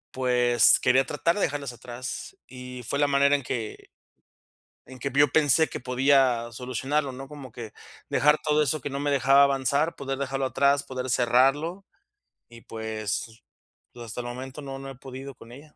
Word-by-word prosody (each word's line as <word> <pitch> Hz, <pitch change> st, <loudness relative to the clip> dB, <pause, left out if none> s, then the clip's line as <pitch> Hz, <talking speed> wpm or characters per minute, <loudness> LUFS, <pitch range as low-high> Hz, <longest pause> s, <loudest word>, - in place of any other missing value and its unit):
Pues 125 Hz, -2 st, +4 dB
quería 130 Hz, +1 st, +3 dB
tratar 165 Hz, +5 st, 0 dB
de 205 Hz, -, -2 dB
dejarlas 140 Hz, -5 st, -2 dB
atrás, 125 Hz, -, -8 dB
y 125 Hz, -1 st, -9 dB
fue 140 Hz, -, -2 dB
la 145 Hz, -, +3 dB
manera 140 Hz, 0 st, +3 dB
en 140 Hz, -, -3 dB
que 115 Hz, -3 st, -5 dB, 1.0 s
en 130 Hz, 0 st, -12 dB
que 140 Hz, -, -3 dB
yo 145 Hz, +1 st, +6 dB
pensé 155 Hz, +2 st, +3 dB
que -, -, -6 dB
podía 125 Hz, -2 st, +2 dB
solucionarlo, 135 Hz, +4 st, -2 dB
¿no? 135 Hz, +1 st, -9 dB
Como 140 Hz, -3 st, -10 dB
que 115 Hz, -2 st, -9 dB, 0.4 s
dejar 150 Hz, +1 st, +4 dB
todo 150 Hz, 0 st, +2 dB
eso 150 Hz, +1 st, 0 dB
que 145 Hz, -, -4 dB
no 140 Hz, -, -3 dB
me 145 Hz, 0 st, -1 dB
dejaba 135 Hz, 0 st, +5 dB
avanzar, 140 Hz, +3 st, +1 dB
poder 135 Hz, -1 st, -4 dB
dejarlo 135 Hz, 0 st, -2 dB
atrás, 140 Hz, +1 st, +2 dB
poder 130 Hz, 0 st, -5 dB
cerrarlo, 135 Hz, +10 st, +2 dB, 0.6 s
y 115 Hz, 0 st, -14 dB
pues, 110 Hz, +1 st, -5 dB, 0.5 s
hasta 120 Hz, 0 st, -6 dB
el 120 Hz, -, -7 dB
momento 130 Hz, +4 st, -7 dB
no 135 Hz, -1 st, -7 dB
no 135 Hz, 0 st, -8 dB
he 135 Hz, -, -9 dB
podido 135 Hz, +1 st, -9 dB
con 115 Hz, 0 st, -15 dB
ella. 145 Hz, +4 st, -14 dB
135 Hz, 175 wpm, -26 LUFS, 125-140 Hz, 1.0 s, yo